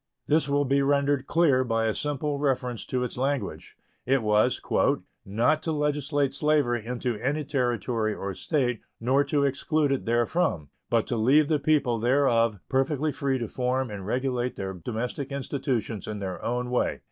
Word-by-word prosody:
This 150 -1 +2
will 145 0 +2
be 140 +1 +2
rendered 140 -1 +1
clear 145 -6 +3
by 115 -2 0
a 110 - +1
simple 145 +1 -1
reference 125 -4 -1
to 125 -1 -1
its 125 - -5
language. 135 +1 -3 0.3
It 135 -1 +1
was 105 0 +2 0.6
"not 115 +10 +1
to 160 - -2
legislate 145 -2 0
slavery 140 -5 +1
into 120 0 -3
any 145 +6 -1
Territory 120 -5 -1
or 100 0 -4
State, 125 - -1 0.2
nor 130 +5 +3
to 145 0 +1
exclude 140 +2 +1
it 135 - -1
therefrom, 120 - +1 0.2
but 115 -2 +2
to 120 - -2
leave 140 +7 +4
the 155 -2 +2
people 140 -6 +2
thereof 115 -3 +2
perfectly 140 +3 0
free 140 -2 -1
to 120 -3 -3
form 125 +1 -1
and 100 -2 -6
regulate 125 +1 -1
their 95 -1 -4
domestic 120 - -4
institutions 130 -6 -3
in 105 - -4
their 95 -2 -5
own 125 +1 -2
way." 125 - 0
130 Hz, 165 wpm, -26 LUFS, 115-145 Hz, 0.6 s, leave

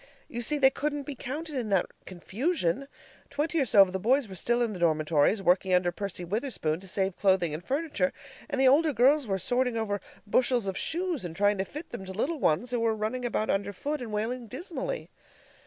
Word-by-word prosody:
You 240 - -5
see, 295 +6 +1
they 265 -2 +5
couldn't 290 0 -2
be 285 - -5
counted 295 +5 -6
in 245 -5 -2
that 195 -3 +3 0.2
confusion. 225 - -1 0.4
Twenty 305 +4 -1
or - - +2
so 205 -4 +7
of 185 -1 -5
the 190 - -1
boys 255 +5 +2
were 190 - -9
still 240 +6 +1
in 225 -3 -1
the 185 - -7
dormitories, 160 +3 +2
working 185 +1 +3
under 180 -1 +2
Percy 180 -1 -5
Witherspoon 190 - -2
to 190 - -11
save 190 0 -1
clothing 185 -5 +2
and 155 +3 -5
furniture, 280 - -1 0.4
and 285 -2 -2
the 265 - +5
older 300 +3 +4
girls 270 +2 +4
were 195 -1 0
sorting 245 +4 0
over 205 -3 -2 0.2
bushels 240 +1 +2
of 190 -1 -2
shoes 345 - -1
and 170 -2 -6
trying 205 +1 +2
to 190 - 0
fit 300 - -9
them - - -6
to 190 - -6
the - - -10
little 310 +7 -1
ones, 240 +6 +1
who 245 - 0
were 225 -1 +1
running 220 +4 -3
about 220 -2 0
underfoot 205 +10 -2
and 235 -3 -6
wailing 230 +3 -2
dismally. 365 - -5
230 Hz, 215 wpm, -28 LUFS, 190-275 Hz, 0.4 s, so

